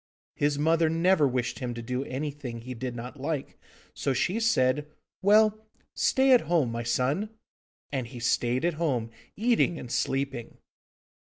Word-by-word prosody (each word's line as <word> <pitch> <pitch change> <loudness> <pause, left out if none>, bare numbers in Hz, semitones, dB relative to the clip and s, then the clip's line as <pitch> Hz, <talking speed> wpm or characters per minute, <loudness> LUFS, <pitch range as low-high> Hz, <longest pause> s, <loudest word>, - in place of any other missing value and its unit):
His 145 0 0
mother 160 +2 +3
never 165 -1 +3
wished 125 -2 -2
him 125 -2 -4
to 120 - -5
do 125 +3 -2
anything 135 -3 -5
he 125 +2 -6
did 125 0 -5
not 125 +4 -7
like, 145 -1 -3 0.4
so 135 - -1
she 180 - 0
said: 150 - +2 0.3
'Well, 215 +2 +4 0.3
stay 265 0 +3
at 250 - +7
home, 155 -6 +1
my 115 0 -3
son.' 130 - 0 0.6
And 130 -4 -2
he 125 0 -9
stayed 120 +3 +1
at 175 - +2
home, 125 -8 0 0.2
eating 225 -6 +2
and 125 - -8
sleeping. 135 -3 -2
140 Hz, 155 wpm, -28 LUFS, 125-170 Hz, 0.6 s, at